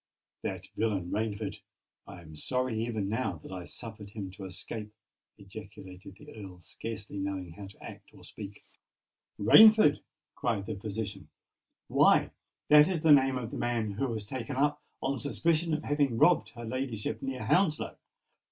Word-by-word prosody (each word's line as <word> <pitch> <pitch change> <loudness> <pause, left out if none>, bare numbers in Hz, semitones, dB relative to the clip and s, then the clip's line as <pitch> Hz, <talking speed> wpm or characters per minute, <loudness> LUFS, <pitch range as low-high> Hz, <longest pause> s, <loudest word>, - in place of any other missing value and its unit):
"That - - -4
villain 100 -5 -1
Rainford! 105 -2 -2 0.5
I 85 - -10
am 80 -2 -13
sorry 125 - -1
even 110 -4 -2
now 110 -4 -1
that - - -10
I 90 -2 -6
suffered 110 -2 -8
him 100 -3 -6
to 95 +1 -9
escape!" 105 +3 -7 0.5
ejaculated 100 -1 -11
the - - -13
Earl, 95 -4 -10
scarcely 100 +2 -6
knowing 95 -3 -3
how 100 +4 -9
to 100 - -16
act - - -11
or - - -17
speak. 105 -1 -10 0.7
"Rainford!" 215 - +8 0.3
cried 110 -5 -1
the 110 - -3
physician. 100 -1 -5 0.6
"Why, - - +4 0.4
that 150 0 +8
is 180 -4 -1
the 160 -1 +5
name 135 -2 +6
of 120 -2 -5
the - - -5
man 115 -3 0
who 110 +7 -1
was 110 -4 -3
taken 130 +4 -5
up 145 +2 +1 0.2
on 135 -1 0
suspicion 165 +5 +1
of 155 - -4
having 145 -5 +1
robbed 175 +6 +4
her 120 -1 -7
ladyship 115 -3 -3
near 135 -1 -4
Hounslow!" 180 -6 +2
110 Hz, 160 wpm, -30 LUFS, 100-130 Hz, 0.7 s, Rainford